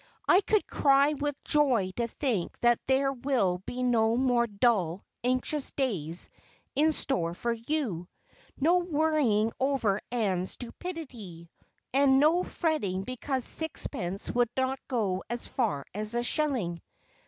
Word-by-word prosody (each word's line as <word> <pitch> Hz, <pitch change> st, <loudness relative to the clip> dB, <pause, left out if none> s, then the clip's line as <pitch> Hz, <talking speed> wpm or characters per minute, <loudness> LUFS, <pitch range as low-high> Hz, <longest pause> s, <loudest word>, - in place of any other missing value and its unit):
I 370 Hz, -, +6 dB
could 425 Hz, +1 st, +1 dB
cry 280 Hz, +1 st, +3 dB
with 290 Hz, 0 st, -2 dB
joy 255 Hz, -11 st, +2 dB
to 235 Hz, -1 st, 0 dB
think 235 Hz, -, -2 dB
that 240 Hz, -1 st, +4 dB
there 270 Hz, +1 st, +2 dB
will 240 Hz, -9 st, 0 dB
be 250 Hz, 0 st, -3 dB
no 230 Hz, -2 st, +3 dB
more 245 Hz, -2 st, +2 dB
dull, 200 Hz, -5 st, +1 dB, 0.2 s
anxious 255 Hz, +3 st, 0 dB
days 180 Hz, -, -1 dB, 0.5 s
in 310 Hz, +3 st, +3 dB
store 175 Hz, -, -1 dB
for 235 Hz, +5 st, -1 dB
you, 230 Hz, -, -2 dB, 0.5 s
no 340 Hz, +6 st, +4 dB
worrying 300 Hz, -10 st, +2 dB
over 255 Hz, -7 st, +1 dB
Ann's 190 Hz, -6 st, 0 dB
stupidity, 235 Hz, -, -8 dB, 0.4 s
and 270 Hz, 0 st, +5 dB
no 315 Hz, +5 st, +4 dB
fretting 210 Hz, -, -1 dB
because 255 Hz, +2 st, -2 dB
sixpence 210 Hz, -, -3 dB
would 245 Hz, -1 st, +2 dB
not 260 Hz, 0 st, 0 dB
go 205 Hz, -7 st, -1 dB
as 240 Hz, +1 st, -3 dB
far 210 Hz, -, -1 dB
as 215 Hz, +3 st, -4 dB
a 240 Hz, -, +1 dB
shilling." 240 Hz, -, -1 dB
245 Hz, 130 wpm, -29 LUFS, 205-280 Hz, 0.5 s, I